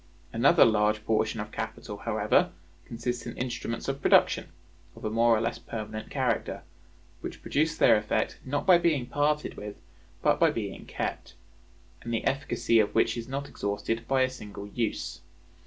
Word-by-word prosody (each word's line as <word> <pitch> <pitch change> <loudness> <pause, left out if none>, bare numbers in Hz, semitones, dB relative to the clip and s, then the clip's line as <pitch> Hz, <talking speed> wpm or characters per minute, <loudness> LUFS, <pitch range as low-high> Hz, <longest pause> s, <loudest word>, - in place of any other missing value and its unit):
Another 140 +8 +6
large 110 -1 +2
portion 110 0 +1
of 105 0 -5
capital, 110 -1 -5
however, 105 +1 +2 0.4
consists 120 +1 -4
in 120 - -7
instruments 120 -2 -3
of 135 0 -2
production, - - +4 0.5
of - - -10
a 105 - -1
more 115 0 +4
or - - -1
less 115 +1 -2
permanent 110 -1 -6
character; 130 -5 -1 0.6
which - - -8
produce 155 +2 +1
their - - +6
effect 105 0 -1
not 145 +2 -2
by 180 -2 +7
being 155 -7 +1
parted 145 +4 0
with, 105 0 -7 0.5
but - - +3
by - - +5
being - - -5
kept; 85 - -4 0.7
and 120 - -6
the 115 -1 -1
efficacy 120 -3 +2
of 105 - +1
which - - +3
is 115 -1 -5
not 140 +2 -4
exhausted 105 +3 -3
by 135 -1 +3
a 130 - +1
single 105 -5 -8
use. 100 -6 -3
115 Hz, 165 wpm, -28 LUFS, 105-130 Hz, 0.7 s, by